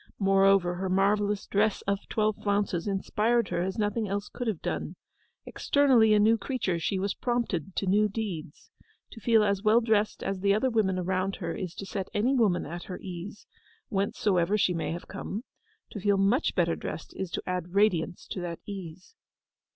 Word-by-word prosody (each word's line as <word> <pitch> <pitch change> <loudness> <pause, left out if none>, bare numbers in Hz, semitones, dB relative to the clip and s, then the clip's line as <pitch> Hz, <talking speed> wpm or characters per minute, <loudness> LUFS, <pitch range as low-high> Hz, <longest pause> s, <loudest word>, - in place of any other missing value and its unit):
Moreover, 195 -2 +4
her 185 +1 -3
marvellous 200 +2 +1
dress 205 0 +1
of 200 0 0
twelve 215 -1 +1
flounces 200 -3 0
inspired 215 +4 +1
her - - -1
as 190 +1 -2
nothing 210 +1 0
else 200 +1 -3
could 245 - -5
have 210 -7 -1
done. - - -3 0.5
Externally 250 -7 +4
a - - +4
new 220 +2 +4
creature, 215 -10 -1
she 190 +4 -1
was 195 +1 -1
prompted 220 - -2
to - - -1
new 210 +3 +3
deeds. 190 -9 -6 0.4
To 225 - -10
feel 225 -1 +4
as 200 -2 +1
well 215 +2 +5
dressed 220 -2 +1
as 195 -1 -2
the 200 +1 +3
other 255 +4 +1
women 200 -5 +1
around 185 +2 -1
her 170 -2 -4
is 180 -4 -5
to 195 - -6
set 195 -1 -4
any 230 +6 +2
woman 215 -9 +2
at 170 +3 -7
her 180 - -6
ease, 185 +3 -8 0.4
whencesoever 195 -2 +1
she 185 -3 +2
may 165 -2 -2
have 170 +1 -6
come: 200 +3 -5 0.5
to 210 - -6
feel 200 0 +2
much 200 +9 +2
better - - +2
dressed - - -7
is 190 - -4
to - - -4
add 180 0 -4
radiance 185 -5 +2
to 185 - -4
that 170 -1 -4
ease. 185 - -8
200 Hz, 185 wpm, -28 LUFS, 185-215 Hz, 0.5 s, well